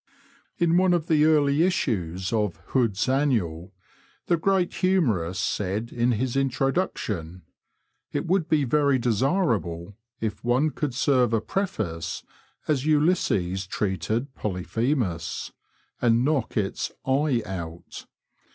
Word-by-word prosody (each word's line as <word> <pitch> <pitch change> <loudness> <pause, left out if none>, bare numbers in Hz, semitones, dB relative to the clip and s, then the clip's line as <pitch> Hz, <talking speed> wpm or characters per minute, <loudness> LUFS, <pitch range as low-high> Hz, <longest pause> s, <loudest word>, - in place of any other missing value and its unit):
In 170 0 +3
one 185 0 +4
of 165 -3 -1
the 155 -2 +3
early 150 -1 +4
issues 95 - 0
of 105 -6 0
Hood's 115 -6 +1
Annual,'* 110 - 0 0.5
the 175 - +3
great 185 +1 +1
humorist 115 - +1
said 105 +4 -2
in 120 +1 +1
his 120 +3 -1
introduction, 125 - -1 0.3
" - - -50
It - - -2
would 175 -2 +1
be 155 -3 +3
very 140 +1 +3
desirable 115 - 0 0.2
if 110 -2 -3
one 125 +6 +2
could 145 -5 -3
serve 130 -4 +2
a 110 - +2
frefo/ce 110 - -3 0.4
as 145 -4 +1
Ulysses 145 - +1
treated 110 +8 -2
Polyphemus 105 - -2 0.2
— - - -39
and 120 0 +3
knock 140 -7 0
its 100 -2 -1
* - - -50
/ 135 +3 +1
* 120 -6 0
out.' 85 -4 -7
125 Hz, 130 wpm, -25 LUFS, 95-150 Hz, 0.5 s, one